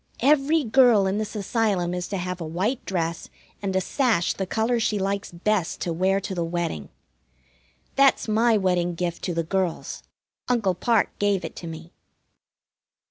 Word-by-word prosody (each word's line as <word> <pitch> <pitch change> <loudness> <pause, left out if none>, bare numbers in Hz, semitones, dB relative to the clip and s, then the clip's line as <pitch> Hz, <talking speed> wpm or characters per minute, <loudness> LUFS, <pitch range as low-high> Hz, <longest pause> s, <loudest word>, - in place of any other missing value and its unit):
every 295 +3 +4
girl 235 -4 +5
in 190 +2 0
this 215 0 -4
Asylum 200 -4 0
is 180 0 -3
to 200 - -3
have 180 0 -4
a - - -2
white 185 +11 -2
dress 170 -3 -2 0.3
and 195 -2 -2
a - - +4
sash 220 -2 +1
the 190 - -4
color 230 +4 +1
she 215 -2 +1
likes 200 +1 -2
best 185 +1 -1
to 170 - -2
wear 190 +3 +2
to 195 - -5
the 175 -2 -1
wedding. 165 - -3 1.1
That's 275 -3 +4
my 220 +1 +3
wedding 180 -3 +1
gift 170 0 -3
to 175 - -2
the 165 - 0
girls. 185 0 -2 0.5
Uncle 225 -7 +2
Parke 225 +4 +1
gave 200 -2 +1
it - - -7
to 170 - -7
me. 165 +2 -9
195 Hz, 170 wpm, -24 LUFS, 175-220 Hz, 1.1 s, girl